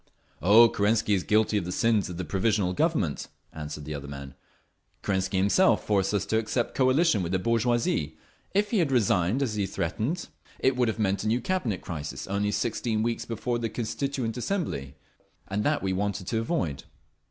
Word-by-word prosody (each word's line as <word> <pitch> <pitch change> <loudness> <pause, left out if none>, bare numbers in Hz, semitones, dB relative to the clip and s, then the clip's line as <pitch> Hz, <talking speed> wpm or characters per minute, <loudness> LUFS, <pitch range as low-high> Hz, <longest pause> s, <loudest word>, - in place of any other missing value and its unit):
"Oh, 110 +6 +8
Kerensky 105 0 +1
is 95 - +2
guilty 105 +1 +2
of 90 - -5
the 90 - -4
sins 110 0 +2
of 90 - -6
the 90 - -3
Provisional 95 +2 +1
Government," 125 - 0 0.3
answered 75 -1 -6
the 75 - -5
other 70 -1 -6
man. 70 -1 -8 0.7
"Kerensky 95 -1 0
himself 100 - +3
forced 100 -2 +1
us 100 -1 0
to 110 +2 +1
accept 115 +2 -1
coalition 130 - +3
with 85 -1 -3
the 95 - +2
bourgeoisie. 115 -7 0 0.3
If 205 +1 +1
he 220 - +2
had 160 -6 +1
resigned, 105 0 +2
as 120 -5 -2
he 100 -2 -1
threatened, 115 - -2 0.3
it 130 - +2
would 125 -1 +2
have 110 - -1
meant 100 -2 0
a - - -2
new 115 +3 +2
Cabinet 125 - -1
crisis 75 -4 -5
only 100 +1 -1
sixteen 110 +1 -1
weeks 115 0 -1
before 120 +1 -2
the 115 -1 -2
Constituent 120 +1 -3
Assembly, 120 - -3 0.5
and 100 +2 -1
that 150 -5 +1
we 95 -1 0
wanted 100 0 -2
to 110 +4 -1
avoid." 115 - -2
105 Hz, 185 wpm, -27 LUFS, 95-120 Hz, 0.7 s, Oh